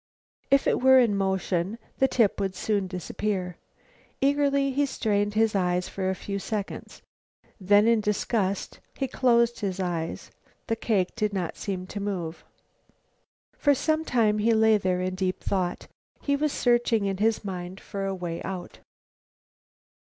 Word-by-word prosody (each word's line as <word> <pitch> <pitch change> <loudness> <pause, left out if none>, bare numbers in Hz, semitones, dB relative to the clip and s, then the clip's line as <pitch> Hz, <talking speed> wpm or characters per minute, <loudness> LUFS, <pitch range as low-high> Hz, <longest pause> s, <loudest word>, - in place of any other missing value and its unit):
If 275 0 +4
it - - +1
were 265 +1 +7
in 235 -5 +4
motion 190 0 -1 0.2
the 265 - +5
tip 225 -7 +2
would 195 -2 -2
soon 200 0 -1
disappear. 185 0 -3 0.6
Eagerly 280 0 +2
he 285 +2 +1
strained 205 -4 0
his 220 0 +3
eyes 180 -2 0
for 190 -1 -2
a 190 - -1
few 200 +2 -4
seconds. 205 0 -5 0.6
Then, 205 +3 +4
in 230 -2 +4
disgust, 205 -1 -1 0.2
he 270 - -2
closed 235 -2 +2
his 195 -2 -3
eyes. 170 -3 -3 0.3
The 225 - -1
cake 205 -5 0
did 210 -3 -1
not 185 -4 -2
seem 185 -2 -4
to 205 - -6
move. 180 -5 -4 1.2
For 285 -1 +4
some 315 +3 0
time 220 -7 +2
he 225 +2 +3
lay 220 -1 +4
there 185 -1 0
in 185 0 -2
deep 185 0 -2
thought. 180 -3 -2 0.3
He 280 - 0
was 300 +1 0
searching 240 -4 +2
in 195 -1 -1
his 220 +1 +1
mind 185 0 -5
for 195 -1 -5
a 195 - -2
way 175 -2 -5
out. 185 -2 -6
205 Hz, 155 wpm, -26 LUFS, 185-235 Hz, 1.2 s, were